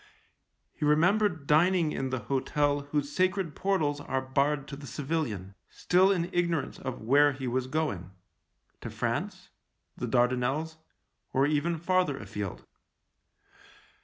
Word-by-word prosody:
He - - -7
remembered 170 +2 +3
dining 165 +2 +3
in 135 -2 -2
the 130 -2 -2
hotel 145 +4 0
whose 145 -1 -1
sacred 185 -3 +1
portals 155 -7 0
are 130 -2 -1
barred 140 +2 0
to 140 - -6
the 140 0 -10
civilian, 130 - -3 0.2
still 185 +2 +3
in 180 -1 -1
ignorance 170 -5 0
of 130 -2 -5
where 145 +5 +5
he 135 -1 -5
was 125 +1 -1
going 130 - -2 0.4
— - - -46
to - - -5
France, - - -3 0.4
the - - -4
Dardanelles, 130 +6 +1 0.6
or 135 +1 +3
even 155 +3 0
farther 175 -3 +1
afield. 105 -7 -6
145 Hz, 130 wpm, -29 LUFS, 130-165 Hz, 0.6 s, where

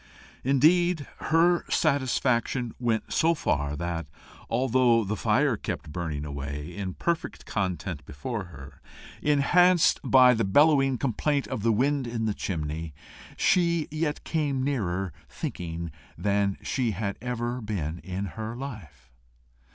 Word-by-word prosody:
Indeed, 155 +4 +3 0.2
her 170 +2 +4
dissatisfaction 125 -3 +1
went 115 -3 -1
so 165 +1 +3
far 75 - -1
that, 85 0 -3 0.4
although 120 -1 +3
the 105 +2 -2
fire 120 +5 +2
kept 75 - -5
burning 75 -3 -3
away 70 +3 -5
in 95 -3 -4
perfect 170 0 -2
content 90 -5 -3
before 105 - -4
her, 70 -5 -12 0.4
enhanced 175 +4 +4
by 130 -1 +6
the 115 -1 0
bellowing 135 +4 +4
complaint 140 +3 0
of - - -3
the 115 +2 +3
wind 135 +4 +1
in 115 -1 -2
the 110 - 0
chimney, 80 -4 -4 0.4
she 170 -3 +2
yet 155 -1 -2
came 145 -5 -1
nearer 95 - -1 0.2
thinking 85 -1 -5 0.3
than 100 -1 +1
she 120 -5 0
had 100 +1 -3
ever 120 0 -3
been 90 -7 -3
in 95 +2 -4
her 110 +4 -6
life. 85 - -9
115 Hz, 130 wpm, -27 LUFS, 90-140 Hz, 0.4 s, by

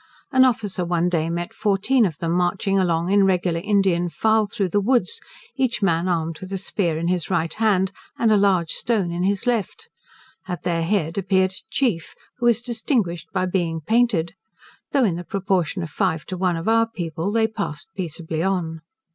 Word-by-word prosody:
An 260 0 +6
officer 210 -7 0
one 175 0 +1
day 165 -2 0
met 175 +5 -3
fourteen 215 +4 +2
of 160 -5 -7
them 165 +2 -2
marching 180 +3 +1
along 170 -1 +1
in 200 0 +5
a - - +5
regular 180 -3 +1
Indian 190 -4 +2
file 220 +3 +2
through 200 -2 -2
the 205 - +2
woods, 255 - +1 0.3
each 255 -5 0
man 170 -1 +2
armed 165 -2 -1
with 190 0 -9
a 195 - -1
spear 180 -4 -1
in 165 +1 -2
his 180 -2 -1
right 165 -3 0
hand, 195 -4 +2 0.3
and 225 -2 +3
a - - +6
large 190 -5 +2
stone 205 -7 0
in 170 +1 -3
his 195 +1 0
left: 235 -5 -2 0.6
at 175 -4 -5
their 170 -2 0
head 165 -1 0
appeared 190 -1 +2
a 190 - -8
chief, 215 -12 -1 0.2
who 240 - +2
was 235 0 +3
distinguished 225 - -1
by 185 -1 0
being 175 -3 -1
painted. 215 -2 +1 0.6
Though 275 - +3
in 185 -7 +1
the 175 - -5
proportion 185 -2 -1
of 165 - -7
five 180 -6 -1
to 185 - -5
one 180 -2 0
of 165 - -5
our 225 0 +4
people 170 -3 -3
they 225 0 +3
passed 205 - -5
peaceably 165 -3 -4
on. 170 -4 -1
185 Hz, 195 wpm, -22 LUFS, 170-210 Hz, 0.6 s, An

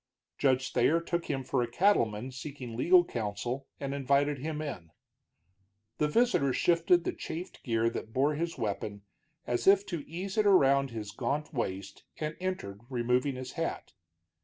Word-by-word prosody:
Judge 130 -1 +2
Thayer 145 +7 +3
took 170 0 -2
him 135 -3 -2
for 130 0 0
a 120 - -1
cattleman 120 - +2
seeking 130 -2 -7
legal 175 +8 +5
counsel, 120 +2 -3
and 140 0 -3
invited 140 +1 +1
him 155 +2 -3
in. 130 - -5 1.1
The 150 - +3
visitor 150 - +2
shifted 170 +2 +3
the - - -2
chafed 170 +3 -7
gear 115 -1 +1
that 110 - -6
bore 140 +5 +2
his 165 +3 -3
weapon, 100 -1 -3 0.4
as 120 +6 -1
if 200 0 +6
to 170 -6 -4
ease 190 +5 -3
it 210 - +4
around 140 -7 +5
his 110 -3 -6
gaunt 140 +8 -2
waist, 100 -7 -4
and 155 0 -3
entered, 180 - -4
removing 125 +2 +1
his 130 0 -6
hat. 165 - -4
140 Hz, 160 wpm, -30 LUFS, 120-165 Hz, 1.1 s, if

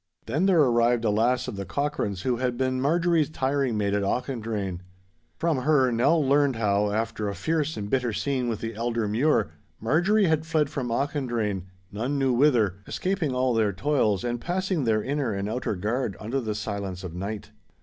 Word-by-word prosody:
Then 150 +11 +1
there 180 -5 +5
arrived 120 -2 +2
a 105 - +3
lass 120 +4 +1
of 100 - -5
the 100 - -3
Cochranes 105 -8 -2
who 125 -2 +1
had 125 -1 -1
been 130 0 0
Marjorie's 165 +1 +2
tiring 135 -5 0
maid 100 -1 0
at 100 - +1
Auchendrayne. 110 -4 -2 0.6
From 165 -3 +1
her 130 -1 +3
Nell 140 +7 +3
learned 140 -1 +3
how, 105 -2 +1
after 110 -1 -2
a 100 - -4
fierce 155 - -1
and 100 -1 -4
bitter 125 +1 0
scene 130 +2 -1
with 110 -2 -3
the 115 0 -4
elder 115 0 -1
Mure, 110 - +2 0.3
Marjorie 175 - +3
had 160 -2 +2
fled 155 -3 0
from 130 -4 -3
Auchendrayne 115 - -1 0.2
none 120 +8 -2
knew 135 -2 +2
whither, 120 -8 +3
escaping 180 -8 -1
all 125 0 +2
their 110 -3 +2
toils 110 -3 +1
and 120 -1 -2
passing 185 -4 -1
their 110 -2 +2
inner 140 -5 -1
and 100 +1 -2
outer 110 -1 -2
guard 110 +3 -2
under 115 +1 -2
silence 100 -3 -4
of 90 -3 -6
night. 100 +4 -5
120 Hz, 180 wpm, -26 LUFS, 105-145 Hz, 0.6 s, there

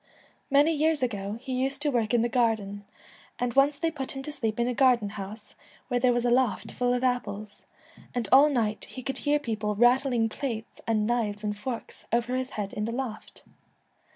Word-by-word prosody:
Many 290 +3 +4
years 310 -1 +2
ago 205 -3 -2
he 260 +1 -5
used 270 +3 0
to 295 - +2
work 230 -4 0
in 240 -2 +3
the - - +2
garden, 220 -5 0 0.5
and 245 -1 -1
once 280 +2 +4
they 330 +2 0
put 275 -4 -5
him 270 - -5
to 300 - -5
sleep 225 -6 -2
in 235 - +2
a 250 - 0
garden 245 -5 +3
house 205 +1 -8 0.4
where 245 -1 +1
there 250 0 +4
was 240 0 0
a 240 - +3
loft 250 -1 +1
full 245 0 0
of 250 - -2
apples, 215 -5 -2 0.5
and 240 -4 -1
all 280 +3 +8
night 220 -6 0
he 255 - -9
could 270 - -3
hear 295 0 +2
people 215 -6 -2
rattling 245 +1 +3
plates 225 -1 -5
and 215 -2 +2
knives 215 -3 -1
and 210 0 -1
forks 230 +3 -6
over 240 +2 +1
his 255 0 -2
head 200 -2 -3
in 210 - -2
the 230 - -3
loft. 240 -3 -6
240 Hz, 205 wpm, -27 LUFS, 215-265 Hz, 0.5 s, all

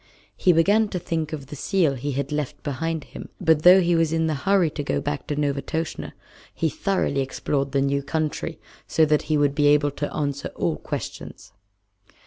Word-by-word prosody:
He 180 - +3
began 205 +7 +4
to 195 - -4
think 165 -3 -3
of 150 -4 -5
the 145 - -9
seal 170 0 +1
he 140 +2 -3
had 140 +2 -3
left 150 -2 -3
behind 155 +2 -2
him, - - -10
but 160 -2 +3
though 180 +3 +8
he 175 0 +2
was 165 -1 +2
in 160 0 +1
a - - 0
hurry 175 +3 +2
to 145 - -4
go 70 - -1
back 75 - -4
to 145 - -2
Novastoshnah, 150 +2 -2 0.4
he - - 0
thoroughly 195 - 0
explored 135 +1 -2
the 140 0 +1
new 140 +1 +1
country, 150 +2 -3 0.3
so 160 - +3
that 150 -1 +2
he 155 - +3
would 145 -1 +2
be 145 0 +2
able 145 0 +4
to 145 +1 -4
answer 140 -2 -2
all - - -1
questions. - - -7
150 Hz, 195 wpm, -24 LUFS, 140-165 Hz, 0.4 s, though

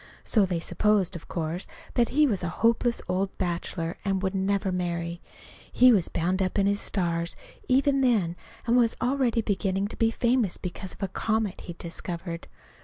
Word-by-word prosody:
So 210 -4 +3
they 175 -2 -1
supposed, 190 +2 +2
of 170 - -8
course, 170 +1 -3 0.3
that 240 -1 +2
he 300 +3 +4
was 215 -9 0
a 175 - -2
hopeless 235 +5 +1
old 190 +2 -1
bachelor 170 -2 -2
and 195 -1 0
wouldn't 190 0 -1
ever 200 -1 +1
marry. 170 -1 -2 0.5
He 255 0 +7
was 200 -7 +3
bound 180 +3 0
up 185 +1 0
in 200 - +3
his 200 0 +2
stars, 170 -4 -1 0.3
even 275 +1 +3
then, 210 -10 +2 0.3
and 235 - +3
was 235 -2 +3
already 245 -2 +1
beginning 195 -1 0
to - - -8
be 225 - +3
famous, 235 -3 +1
because 185 +1 -6
of - - -8
a - - +1
comet 220 +1 -1
he'd 170 -1 -7
discovered. 170 0 -6
195 Hz, 180 wpm, -27 LUFS, 175-230 Hz, 0.5 s, He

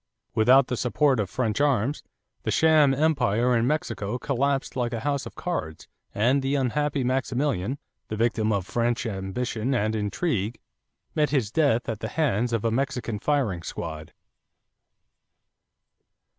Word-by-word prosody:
Without 125 +4 +5
the 125 - -3
support 130 +2 +2
of 100 -3 -1
French 110 +3 -1
arms, 140 -1 +1 0.4
the - - -3
sham 155 -3 +5
empire 125 -5 +2
in 115 +1 +2
Mexico 115 -7 -2
collapsed 140 +1 -1
like 120 -2 -1
a 115 - -3
house 140 0 -1
of - - -12
cards 125 - -4 0.3
and 125 +7 +3
the 135 +1 0
unhappy 140 +1 0
Maximilian, 130 -2 -1 0.3
the 110 - -4
victim 110 -1 +1
of 100 -4 0
French 120 +3 0
ambition 110 +5 -2
and 110 -1 0
intrigue, 110 - -1 0.5
met 150 -1 +2
his 130 -8 0
death 140 -5 +2
at 110 -3 -3
the 110 - -3
hands 125 -5 0
of 115 -1 -1
a 115 - +2
Mexican 120 -3 -2
firing 125 - 0
squad. 80 -2 -6
125 Hz, 145 wpm, -26 LUFS, 110-140 Hz, 0.5 s, Without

